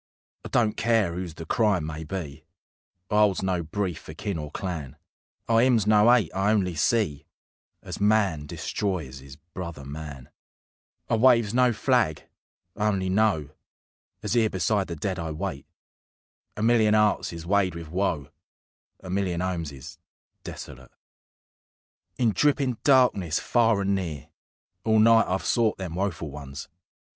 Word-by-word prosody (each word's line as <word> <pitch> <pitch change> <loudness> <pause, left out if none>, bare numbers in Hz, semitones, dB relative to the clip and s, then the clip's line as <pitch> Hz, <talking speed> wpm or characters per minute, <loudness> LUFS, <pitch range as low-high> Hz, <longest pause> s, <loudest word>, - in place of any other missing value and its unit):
I - - -6
don't 110 -3 +2
care 115 -6 +1
'oose 90 -2 -5
the 80 - -8
Crime 100 -3 +1
may 80 0 -5
be; 80 -3 -6 0.7
I 105 - +2
'olds 105 -3 +3
no 95 -2 0
brief 90 0 -3
for 75 - -11
kin 100 -1 -4
or 75 -1 -6
clan; 80 -6 -5 0.5
I 115 0 +4
'ymns 120 -5 +3
no 105 +2 +5
'ate: 115 -9 +3
I 95 +2 +1
only 95 -5 +1
see 80 -2 0 0.6
As - - -7
man 100 -8 +2
destroys 80 -8 -3
his 65 +1 -12
brother 85 -2 -8
man; 70 -2 -8 0.8
I 115 - +1
waves 115 -3 +4
no 125 0 +4
flag: 115 - +1 0.5
I 105 0 0
only 95 -3 0
know, 95 -7 +1 0.7
As - - -1
'ere 115 -2 +3
beside 95 +2 0
the 85 - -5
dead 90 +3 -3
I 80 -1 -4
wait, 75 -3 -5 0.9
A 105 - -2
million 110 -2 +4
'earts 105 -1 +2
is 85 -1 -8
weighed 95 -1 +1
with 85 -2 -8
woe, 90 -6 -1 0.7
A 95 - -9
million 95 -3 -1
'omes 85 -5 -3
is 75 +5 -11 0.4
desolate. 65 0 -9 1.3
In 120 -3 +2
drippin' 135 -1 +1
darkness, 120 - +3
far 115 -4 +2
and 100 0 +1
near, 80 -8 -4 0.5
All 110 0 +3
night 115 +1 +5
I've 95 +1 -2
sought 115 -3 +2
them 90 -4 -5
woeful 85 -4 -3
ones. 70 0 -8
95 Hz, 150 wpm, -26 LUFS, 80-110 Hz, 1.3 s, no